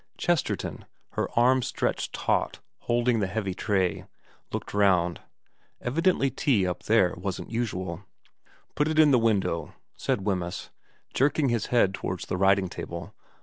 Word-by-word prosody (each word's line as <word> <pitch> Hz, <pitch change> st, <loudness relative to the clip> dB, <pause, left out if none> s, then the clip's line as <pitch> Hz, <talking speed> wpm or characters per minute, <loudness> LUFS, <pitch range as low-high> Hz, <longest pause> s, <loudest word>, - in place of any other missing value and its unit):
Chesterton, 175 Hz, -3 st, -1 dB, 0.3 s
her -, -, -2 dB
arms 125 Hz, +1 st, +4 dB
stretched -, -, -1 dB
taut -, -, 0 dB, 0.2 s
holding 120 Hz, 0 st, +1 dB
the 100 Hz, -, 0 dB
heavy 100 Hz, -1 st, -2 dB
tray, 95 Hz, -1 st, 0 dB, 0.5 s
looked -, -, -5 dB
round. 90 Hz, -4 st, +2 dB, 0.6 s
Evidently 145 Hz, 0 st, +1 dB
tea 120 Hz, -, +2 dB
up 90 Hz, -1 st, -2 dB
there 105 Hz, -5 st, +4 dB
wasn't 90 Hz, 0 st, -5 dB
usual. 95 Hz, -6 st, -3 dB, 0.3 s
' -, -, -33 dB
Put 150 Hz, +1 st, +2 dB
it 155 Hz, 0 st, -1 dB
in 155 Hz, -2 st, +7 dB
the 125 Hz, -, +5 dB
window/ 95 Hz, -8 st, 0 dB, 0.2 s
said 125 Hz, -8 st, -1 dB
Wemyss, 90 Hz, -4 st, -2 dB, 0.4 s
jerking 140 Hz, +1 st, +2 dB
his 115 Hz, -3 st, 0 dB
head 110 Hz, -6 st, +3 dB
towards 90 Hz, -1 st, -4 dB
the 90 Hz, -, -2 dB
writing 95 Hz, 0 st, +3 dB
table. 85 Hz, -1 st, -7 dB
105 Hz, 145 wpm, -27 LUFS, 95-125 Hz, 0.6 s, in